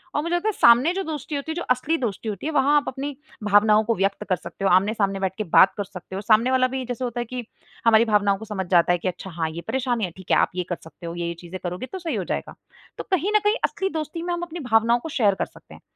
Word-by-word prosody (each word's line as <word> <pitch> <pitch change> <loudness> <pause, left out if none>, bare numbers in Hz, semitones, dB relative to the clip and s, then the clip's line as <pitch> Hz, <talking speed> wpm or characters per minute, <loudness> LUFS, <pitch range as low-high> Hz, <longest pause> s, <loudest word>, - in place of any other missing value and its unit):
और 295 - +2
मुझे 340 +1 0
लगता 350 +5 -1
है - - -1
सामने 245 +8 +5
जो 390 0 -2
दोस्ती 305 -2 -5
होती 285 +3 -3
है, - - -4
जो 345 - -3
असली 295 +6 +1
दोस्ती 220 -3 -3
होती 200 +5 -6
है 315 - -1
वहाँ 285 +1 +3
आप 290 - 0
अपनी 275 +2 -4 0.3
भावनाओं 210 +1 +5
को 230 +1 0
व्यक्त 195 +2 0
कर 185 - +3
सकते 195 +3 -7
हो, - - +4
आमने-सामने 195 +1 +2
बैठ 190 -1 -2
के 215 - -1
बात 185 +2 +5
कर 205 - -1
सकते 190 -1 -10
हो। 195 - -3
सामने 225 +4 +3
वाला 255 0 +3
भी 260 0 -4
जैसे 245 +1 -4
होता 240 -1 -3
है 240 - -2
कि 245 0 -6 0.4
हमारी 225 0 +6
भावनाओं 205 -2 +2
को 220 - -9
समझ 195 -3 -4
जाता 175 -1 +4
है 175 - +3
कि 180 - -4
अच्छा 185 +1 -5
हाँ, 165 -2 -2
ये 165 +2 -7
परेशानी 245 -5 0
है, 175 - -7
ठीक 190 - -8
है। - - +5
आप - - +3
ये 180 - -1
कर 175 - -1
सकते 165 +1 -13
हो, 170 - -4
ये-ये 170 0 -3
चीज़ें 180 +1 -8
करोगे 180 +7 -4
तो 380 - -5
सही 325 -8 -3
हो 190 - -1
जाएगा। - - -4 0.4
तो - - -4
कहीं 375 +3 +1
न - - +7
कहीं 420 +2 +3
असली 385 0 -2
दोस्ती 315 0 -4
में 350 0 -2
हम 345 - -3
अपनी 345 0 -6
भावनाओं 235 -2 +3
को 320 - -7
शेयर 215 -8 +2
कर - - -1
सकते - - -17
हैं - - -14
225 Hz, 295 wpm, -23 LUFS, 195-285 Hz, 0.4 s, न